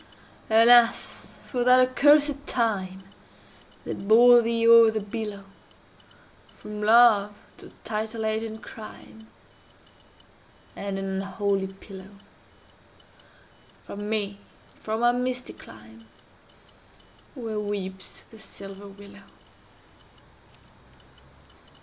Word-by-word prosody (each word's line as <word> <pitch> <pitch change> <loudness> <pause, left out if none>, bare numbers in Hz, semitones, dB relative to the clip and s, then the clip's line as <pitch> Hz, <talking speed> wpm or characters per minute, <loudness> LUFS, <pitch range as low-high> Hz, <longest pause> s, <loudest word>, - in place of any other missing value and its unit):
Alas! 230 +1 +3
for 245 -2 -3
that 250 +1 +5
accursed 285 +2 +3
time 195 -6 -2 0.8
They - - -4
bore 235 +4 +5
thee 230 0 0
o'er 230 -1 +7
the 220 0 -2
billow, 210 -1 -7 1.1
From 210 0 -9
Love 210 -2 +4 0.2
to - - -14
titled 220 +1 -4
age 220 0 -1
and 220 -1 -8
crime, 220 0 -13 1.5
And 200 -1 -5
an 195 0 -4
unholy 195 0 -2
pillow!— 195 0 -13 1.7
From 205 +1 -8
me, 205 -2 -2 0.3
and - - -28
from 220 +2 -3
our 240 0 +4
misty 250 0 -4
clime, 110 0 -16 1.3
Where 225 -5 -5
weeps 190 -2 -6
the 220 - -17
silver 200 -1 -10
willow! 200 0 -15
215 Hz, 95 wpm, -25 LUFS, 200-230 Hz, 1.7 s, o'er